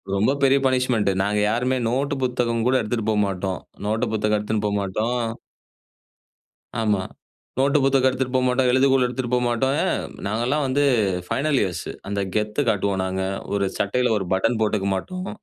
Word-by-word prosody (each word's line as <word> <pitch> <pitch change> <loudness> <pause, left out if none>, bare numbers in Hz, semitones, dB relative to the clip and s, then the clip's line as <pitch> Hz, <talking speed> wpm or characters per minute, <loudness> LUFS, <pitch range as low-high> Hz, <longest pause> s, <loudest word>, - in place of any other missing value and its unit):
ரொம்ப 110 +7 +2
பெரிய 135 +1 +5
பனிஷ்மென்ட். 125 -6 +1
நாங்க 105 +1 0
யாருமே 125 +3 0
நோட்டு, 140 +3 0
புத்தகம் 120 -2 0
கூட 130 - +3
எடுத்துட்டு 110 0 -2
போமாட்டோம். 95 -3 -1 0.3
நோட்டு 110 +3 0
புத்தகம் 105 0 +1
எடுத்துன்ட்டு 105 0 -1
போமாட்டோம். 105 +4 -1 1.6
ஆமா. 105 -3 +1 0.6
நோட்டு, 140 +2 +3
புத்தகம் 135 -1 +3
எடுத்துட்டு 130 0 -2
போமாட்டோம், 125 0 +2
எழுதுகோள் 130 0 +4
எடுத்துட்டு 125 0 -3
போமாட்டோம். 125 +2 +1
ஏன் - - 0 0.3
நாங்கெல்லாம் 120 +8 0
வந்து 140 +3 +1 0.4
ஃபைனல் 135 +4 +1
இயர்ஸ் 90 -4 -3 0.2
அந்த 100 0 -1
கெத்து 105 +6 0
காட்டுவோம் 100 -2 0
நாங்க. 95 0 -2 0.3
ஒரு 100 -1 +1
சட்டையில 125 +3 +1
ஒரு 95 - -4
பட்டன் 100 +5 +1
போட்டுக்க 105 -2 +1
மாட்டோம். 185 - -5
115 Hz, 145 wpm, -23 LUFS, 105-130 Hz, 1.6 s, பெரிய